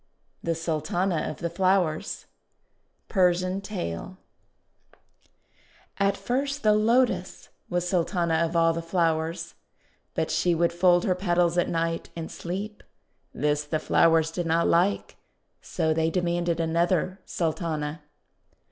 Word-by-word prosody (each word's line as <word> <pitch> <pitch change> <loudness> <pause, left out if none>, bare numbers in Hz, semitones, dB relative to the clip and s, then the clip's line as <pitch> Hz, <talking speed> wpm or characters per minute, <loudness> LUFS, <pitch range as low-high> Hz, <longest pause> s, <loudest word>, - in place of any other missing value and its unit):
THE 165 0 -1
SULTANA 165 +2 -1
OF 155 - -6
THE 170 - -3
FLOWERS 185 -3 0 0.8
Persian 185 0 +2
Tale 185 - -5 1.8
AT 200 0 +2
first 275 +3 -2
the 215 -1 +5
Lotus 235 +4 +1 0.2
was 175 0 -1
Sultana 175 -1 0
of 165 +1 0
all 165 0 +4
the 165 - -3
flowers, 165 -1 -1 0.6
But - - -1
she 175 -1 +2
would 170 +1 +1
fold 175 0 +4
her 185 - +3
petals 175 -2 +1
at - - +1
night, 165 0 -1
and 165 -1 -6
sleep. 200 +5 -5 0.5
This 150 +1 0
the 150 +2 -1
flowers 160 0 +3
did 175 0 -3
not 165 +1 +2
like, 185 +4 +1 0.4
so 160 -2 0
they 160 0 +1
demanded 175 -1 0
another 170 +3 +1
Sultana. 160 -2 -2
170 Hz, 120 wpm, -26 LUFS, 165-185 Hz, 1.8 s, the